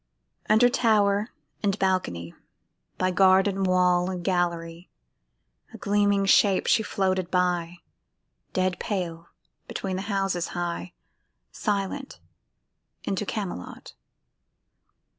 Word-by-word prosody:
Under 220 +3 +6
tower 210 -3 +2 0.3
and 200 -1 0
balcony, 135 - -1 0.6
By 185 0 +1
garden 190 +1 +4
wall 180 -1 +3
and 180 -2 -4
gallery, 170 -1 -2 0.9
A - - -8
gleaming 205 -1 +2
shape 195 0 +4
she 225 - +3
floated 190 -4 -1
by, 175 -1 0 0.7
Dead 185 -1 0
pale 170 -5 -4 0.4
between 190 -2 -4
the - - -3
houses 195 -3 0
high, 175 +1 -3 0.6
Silent 210 +6 -3 0.8
into 195 +1 -2
Camelot. 190 - -6
190 Hz, 95 wpm, -26 LUFS, 175-200 Hz, 0.9 s, Under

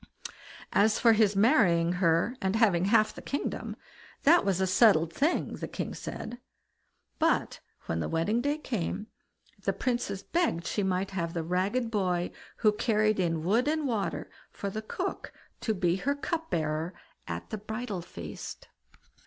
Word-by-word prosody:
As 215 +1 +4
for 230 -2 +5
his 215 -2 +3
marrying 195 - +4
her, 170 +7 +3
and 190 +2 0
having 195 -6 +3
half 215 +1 +4
the - - -9
kingdom, 280 - -3 0.5
that 335 +4 +6
was 190 -2 +1
a 190 - +3
settled 185 -4 +4
thing, 300 - 0
the - - -5
king - - -4
said. 240 - -6 0.8
But - - +1 0.3
when 80 - -2
the - - -2
wedding 200 +9 +1
day 290 +3 0
came, 215 - -3 0.6
the - - 0
Princess 235 -6 -2
begged 330 - 0
she 210 - -1
might 190 0 0
have 170 -3 -3
the 165 - -1
ragged 195 +8 0
boy 180 -4 0 0.3
who 215 - +4
carried 215 -1 +1
in 165 -3 0
wood 225 - +2
and 310 0 +1
water 205 -8 -2 0.2
for 200 - -5
the 215 - -4
cook 215 - -4 0.3
to 220 - -1
be 180 -1 +1
her 280 +8 0
cup 325 +3 -3
bearer 160 +2 -1 0.3
at 85 0 -5
the 215 - -3
bridal 220 -2 -4
feast. 85 - -8
200 Hz, 160 wpm, -29 LUFS, 175-230 Hz, 0.8 s, that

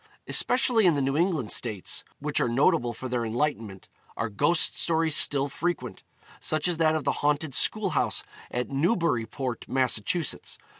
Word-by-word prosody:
Especially 245 -5 +3
in 170 - +4
the 140 - 0
New 135 +1 -1
England 160 - 0
states, 110 -6 -2
which - - -2
are - - +1
notable 130 0 +2
for 125 +3 -7
their 125 -1 -2
enlightenment, 115 -5 -3 0.3
are 115 - -2
ghost 160 +11 +2
stories 160 -2 +1
still 140 -1 +4
frequent 175 +5 -4 0.4
such 155 0 -1
as 175 -2 -1
that 160 -1 +2
of 155 - -2
the 140 - +1
haunted 145 0 0
school 205 +6 +4
house - - -1 0.3
at 125 +2 -4
Newburyport, 135 - -1
Mass. 130 -4 +1
145 Hz, 155 wpm, -26 LUFS, 120-165 Hz, 0.4 s, in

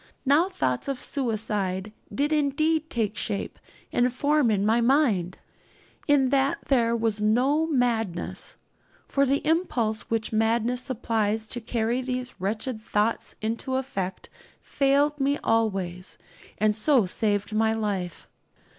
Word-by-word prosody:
Now 300 +7 +4
thoughts 130 - -1
of 275 -2 -2
suicide 210 -6 -2 0.2
did 290 +3 0
indeed 310 +2 +1
take 220 -3 -1
shape 205 -1 -3 0.3
and 245 +1 +3
form 285 0 +2
in 205 -2 +1
my 225 +2 +3
mind. 230 - +2 0.7
In 280 -3 +4
that 275 +1 +2
there 235 -4 +3
was 220 -2 0
no 260 +9 +2
madness, 230 - -1 0.5
for 275 0 +2
the 275 +2 0
impulse 250 -10 0
which 225 0 -1
madness 230 +3 +1
supplies 225 -4 -1
to 240 - -4
carry 230 +2 -1
these 250 -4 -5
wretched 215 +4 -2
thoughts 215 +1 -1
into 230 +4 -2
effect 195 -9 -4 0.3
failed 285 +2 +1
me 280 +1 +1
always, 185 -6 -1 0.4
and 215 0 +2
so 240 0 +3
saved 205 +2 -1
my 220 +1 +2
life. 200 -6 -3
230 Hz, 130 wpm, -26 LUFS, 215-275 Hz, 0.7 s, Now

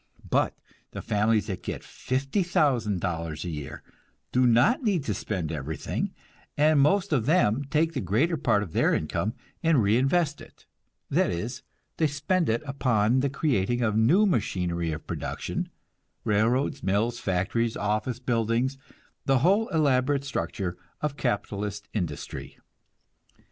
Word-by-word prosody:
But - - +2 0.4
the - - -5
families 105 0 +2
that - - -4
get - - -5
$50,000 120 - 0
a - - -3
year 75 -3 -7 0.5
do 125 0 +4
not 120 - +4
need 200 - +1
to 110 - -1
spend 90 -6 -3
everything, 75 -1 -3 0.5
and 150 0 +4
most 195 +5 +3
of 125 -4 +1
them 145 -6 +3
take 160 +3 +1
the 135 - -2
greater 115 - +1
part 105 -9 +2
of 85 - -9
their - - +3
income 110 +4 -2 0.3
and 160 -8 +3
reinvest 135 - +2
it - - -16 0.5
that - - +3
is, 100 +9 -4 0.4
they 160 - +3
spend 155 +4 0
it 115 +5 0
upon 125 -4 +2
the 140 +1 +1
creating 120 -5 0
of 110 -2 +1
new 145 - +5
machinery 90 - 0
of 75 0 -6
production, - - -4 0.5
railroads, 115 +6 +1
mills, 110 +5 0
factories, 105 +5 0
office 110 +4 -1
buildings, 120 +2 0 0.5
the 135 -1 +4
whole 205 +5 +4
elaborate 140 -3 +2
structure 90 -6 -3 0.2
of 150 -2 -1
capitalist 105 -5 -2
industry. 75 -7 -4
120 Hz, 135 wpm, -27 LUFS, 100-145 Hz, 0.5 s, new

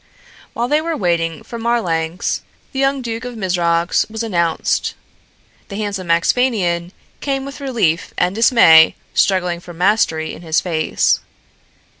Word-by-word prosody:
While 240 +1 -1
they 300 +3 +2
were 325 -1 -2
waiting 165 -4 -1
for 235 - -8
Marlanx 180 -8 -1 0.3
the 265 - -4
young 270 -1 +1
Duke 230 0 -4
of 245 -2 -7
Mizrox 175 -3 +1
was 220 +1 -4
announced. 170 -7 0 0.7
The 200 - -8
handsome 200 -4 -4
Axphainian 175 -1 +1 0.3
came 270 -1 -2
with 275 +1 -9
relief 225 - 0
and 180 +1 +1
dismay 205 -8 +6 0.2
struggling 180 -3 +1
for 175 0 -12
mastery 175 -4 +1
in - - -10
his 160 -2 +1
face. 160 -3 +1
185 Hz, 135 wpm, -18 LUFS, 170-235 Hz, 0.7 s, dismay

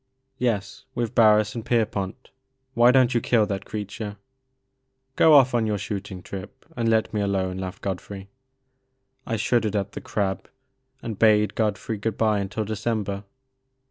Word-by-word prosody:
"Yes, 105 -5 -2
with 120 -1 -2
Barris 105 -2 +5
and 115 - -5
Pierpont. 110 -1 -1 0.4
Why 120 -1 +5
don't 130 -1 +4
you 120 - +2
kill 115 -2 +3
that 100 -2 -4
creature? 105 0 -6 1.0
"Go 160 - +6
off 130 -3 +6
on 115 -2 +2
your 105 -1 0
shooting 100 -2 -5
trip, 100 +7 -9
and 115 -1 0
let 110 0 +1
me 105 - 0
alone,'* 95 -2 -1
laughed 95 -1 -6
Godfrey. 95 0 -5 1.0
I 115 - -1
shuddered 115 -1 +1
at 100 -1 -1
the - - -7
"crab," 95 -3 -2 0.5
and 110 -4 -5
bade 105 -1 +4
Godfrey 110 0 -1
good 110 0 -2
bye 110 -2 +2
until 105 +2 -3
December. 105 -2 -2
105 Hz, 150 wpm, -24 LUFS, 100-115 Hz, 1.0 s, Go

